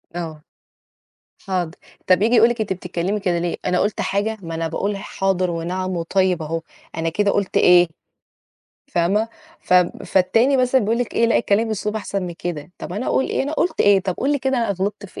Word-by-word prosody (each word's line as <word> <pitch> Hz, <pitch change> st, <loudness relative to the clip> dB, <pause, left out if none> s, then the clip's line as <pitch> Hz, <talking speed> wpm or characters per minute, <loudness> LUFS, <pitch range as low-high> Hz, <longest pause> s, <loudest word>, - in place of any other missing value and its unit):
آه، 160 Hz, -3 st, -5 dB, 1.0 s
حاضر، 180 Hz, -4 st, -1 dB, 0.4 s
طَب 185 Hz, +1 st, +4 dB
ييجي 230 Hz, +3 st, +3 dB
يقول 230 Hz, +1 st, +6 dB
لِك 235 Hz, -2 st, -2 dB
أنتِ 200 Hz, -3 st, -1 dB
بتتكلمي 180 Hz, +3 st, -3 dB
كده 180 Hz, -3 st, 0 dB
ليه؟ 175 Hz, 0 st, -1 dB
أنا 180 Hz, 0 st, +1 dB
قُلت 205 Hz, 0 st, 0 dB
حاجة؟ 205 Hz, +3 st, -1 dB
ما 165 Hz, -1 st, -6 dB
أنا 165 Hz, 0 st, -1 dB
باقول 200 Hz, +4 st, -2 dB
حاضر 190 Hz, -2 st, -1 dB
ونعم 180 Hz, +2 st, -3 dB
وطيب 180 Hz, 0 st, +1 dB
أهُه، 165 Hz, +1 st, -3 dB, 0.4 s
أنا 165 Hz, 0 st, 0 dB
كده 200 Hz, +4 st, +1 dB
قُلت 200 Hz, -2 st, 0 dB
إيه؟ 180 Hz, -1 st, +6 dB, 1.1 s
فاهمة؟ 195 Hz, +6 st, +1 dB, 0.3 s
فب 180 Hz, -1 st, +2 dB
فالتاني 225 Hz, +9 st, +3 dB
مثلًا 255 Hz, 0 st, +3 dB
بيقول 225 Hz, +3 st, 0 dB
لِك 245 Hz, -, -3 dB
إيه؟ 230 Hz, -, +3 dB
لأ 230 Hz, -, +3 dB
اتكلِّمي 215 Hz, 0 st, +2 dB
بأسلوب 215 Hz, -1 st, -2 dB
أحسن 200 Hz, -2 st, -3 dB
من 175 Hz, -2 st, -5 dB
كده، 175 Hz, -1 st, -6 dB
طب -, -, -7 dB
أنا 210 Hz, +6 st, -3 dB
أقول 265 Hz, -, +2 dB
إيه، -, -, -1 dB
أنا 285 Hz, +3 st, -3 dB
قُلت 335 Hz, +3 st, 0 dB
إيه، 200 Hz, -1 st, +5 dB
طب 185 Hz, -1 st, -2 dB
قُل 285 Hz, +2 st, +1 dB
لي 285 Hz, -, +1 dB
كده 265 Hz, 0 st, 0 dB
أنا 230 Hz, -3 st, 0 dB
غلطت 200 Hz, +2 st, -3 dB
في -, -, -11 dB
195 Hz, 200 wpm, -21 LUFS, 175-220 Hz, 1.1 s, يقول